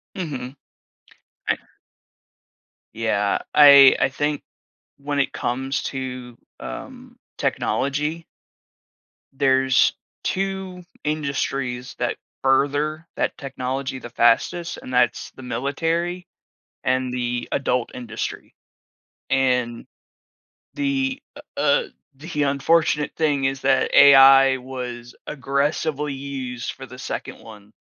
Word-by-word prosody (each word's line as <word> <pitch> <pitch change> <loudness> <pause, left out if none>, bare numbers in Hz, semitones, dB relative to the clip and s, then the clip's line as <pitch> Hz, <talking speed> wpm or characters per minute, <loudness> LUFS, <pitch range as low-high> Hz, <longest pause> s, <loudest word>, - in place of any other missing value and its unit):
Mhm. 135 -8 -5 0.9
I - - +2 1.4
Yeah, 105 -3 0
I 140 -2 +9
I - - +3
think 145 +2 -2 0.5
when 145 0 -3
it 140 - 0
comes 135 +3 -2
to, 125 -2 -6 0.2
um, - - -9 0.2
technology 150 +4 -1 1.1
there's 135 -1 +3 0.3
2 190 -1 -3 0.2
industries 135 -4 -2
that 120 - -1 0.3
further 145 +4 +1
that - - -1
technology 130 -1 -4
the 120 - -9
fastest, 120 +9 +1
and 130 - -8
that's 120 -2 +1
the 130 - -11
military 165 +8 -2 0.6
and 130 0 0
the 120 -1 -2
adult 125 -3 0
industry, 115 -3 -6 0.8
and 125 -3 +1 0.9
the, 275 -1 -1
uh - - -10 0.2
uh, - - +3 0.3
the 150 +1 -3
unfortunate 150 +2 +2
thing 145 -4 +1
is 135 0 -1
that 135 0 +2
AI 135 -1 +8
was 125 -2 -7
aggressively 145 +1 -1
used 135 -3 -5
for 135 - -10
the 125 - -12
2nd - - -6
one 105 -2 -14
135 Hz, 100 wpm, -22 LUFS, 125-150 Hz, 1.4 s, I